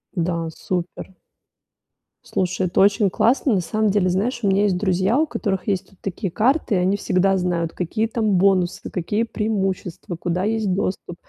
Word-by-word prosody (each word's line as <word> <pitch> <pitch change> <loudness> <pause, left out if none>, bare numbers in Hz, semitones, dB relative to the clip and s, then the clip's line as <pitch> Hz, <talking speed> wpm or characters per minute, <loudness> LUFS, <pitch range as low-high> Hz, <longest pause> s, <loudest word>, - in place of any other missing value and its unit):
Да, 170 -2 -1
супер. 180 +2 -5 1.1
Слушай, 185 0 -1
это 180 - +1
очень 200 0 +4
классно. 230 +5 +2
На 190 - +2
самом 215 +4 0
деле, 190 -2 +2
знаешь, 230 +7 -1
у 200 - +2
меня 195 +1 +3
есть 195 -3 +2
друзья, 190 +4 +1
у 310 - +3
которых 205 -8 -3
есть 195 -3 -1
вот 195 - -24
такие 195 0 -3
карты, 255 - +1
и - - +3
они 185 +3 +1
всегда 195 0 +2
знают, 170 -2 -1
какие 215 +6 -1
там 220 -2 0
бонусы, 190 0 +1
какие 205 +5 -1
преимущества, 195 -6 -3
куда 175 +1 -2
есть 215 -2 0
доступ. 185 -2 -3
195 Hz, 170 wpm, -22 LUFS, 180-215 Hz, 1.1 s, очень